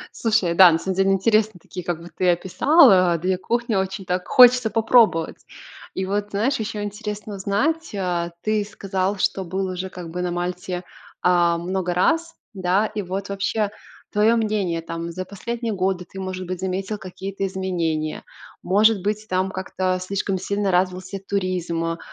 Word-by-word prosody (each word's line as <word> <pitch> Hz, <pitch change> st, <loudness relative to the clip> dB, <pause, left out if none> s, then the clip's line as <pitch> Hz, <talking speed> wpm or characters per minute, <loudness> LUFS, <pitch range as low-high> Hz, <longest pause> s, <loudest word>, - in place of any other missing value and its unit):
Слушай, 215 Hz, -7 st, +1 dB
да, 185 Hz, 0 st, +9 dB
на 160 Hz, -, +2 dB
самом 190 Hz, +2 st, -3 dB
деле 195 Hz, 0 st, +3 dB
интересные 215 Hz, 0 st, +2 dB
такие, 180 Hz, +1 st, -8 dB
как 175 Hz, -1 st, -2 dB
бы 170 Hz, -, -10 dB
ты 180 Hz, +2 st, +1 dB
описал, 190 Hz, -, +5 dB
а, 180 Hz, -3 st, +4 dB
2 185 Hz, +3 st, 0 dB
кухни 235 Hz, +3 st, -1 dB
очень 190 Hz, +1 st, -2 dB
так 180 Hz, 0 st, -2 dB
хочется 250 Hz, -2 st, +6 dB
попробовать. 225 Hz, -7 st, +3 dB, 0.6 s
И 190 Hz, -, -2 dB
вот, 205 Hz, +1 st, -1 dB
знаешь, 220 Hz, +8 st, 0 dB
еще 215 Hz, -1 st, -4 dB
интересно 210 Hz, 0 st, -5 dB
узнать: 270 Hz, +12 st, -1 dB
а, 175 Hz, -3 st, -1 dB
ты 215 Hz, -1 st, 0 dB
сказал, 195 Hz, -1 st, -2 dB
что 190 Hz, 0 st, 0 dB
был 190 Hz, +2 st, -2 dB
уже 185 Hz, 0 st, -4 dB
как 175 Hz, -3 st, -8 dB
бы 180 Hz, +2 st, -4 dB
на 180 Hz, -, -1 dB
Мальте, 180 Hz, +1 st, -3 dB, 0.4 s
а, 175 Hz, -1 st, +3 dB
много 180 Hz, +1 st, -2 dB
раз, 330 Hz, -, +1 dB, 0.2 s
да. 190 Hz, +2 st, +1 dB
И 210 Hz, -1 st, -4 dB
вот 190 Hz, +2 st, -4 dB
вообще 200 Hz, +1 st, -1 dB, 0.4 s
твое 215 Hz, +3 st, +3 dB
мнение, 210 Hz, -6 st, 0 dB
там, 165 Hz, +1 st, -5 dB
за 185 Hz, +2 st, -5 dB
последние 230 Hz, +3 st, -4 dB
годы 185 Hz, -1 st, -1 dB
ты, 195 Hz, -, -10 dB
может 185 Hz, -1 st, -5 dB
быть, 180 Hz, 0 st, -4 dB
заметил 190 Hz, +2 st, -2 dB
какие-то 195 Hz, 0 st, -5 dB
изменения, 170 Hz, -5 st, -2 dB, 0.4 s
может 205 Hz, +2 st, +3 dB
быть, 210 Hz, +2 st, -2 dB
там 185 Hz, +1 st, 0 dB
как-то 185 Hz, -1 st, -2 dB
слишком 190 Hz, +1 st, -2 dB
сильно 200 Hz, +1 st, -1 dB
развился 185 Hz, +1 st, 0 dB
туризм, 170 Hz, -4 st, -2 dB
190 Hz, 165 wpm, -22 LUFS, 180-210 Hz, 0.6 s, да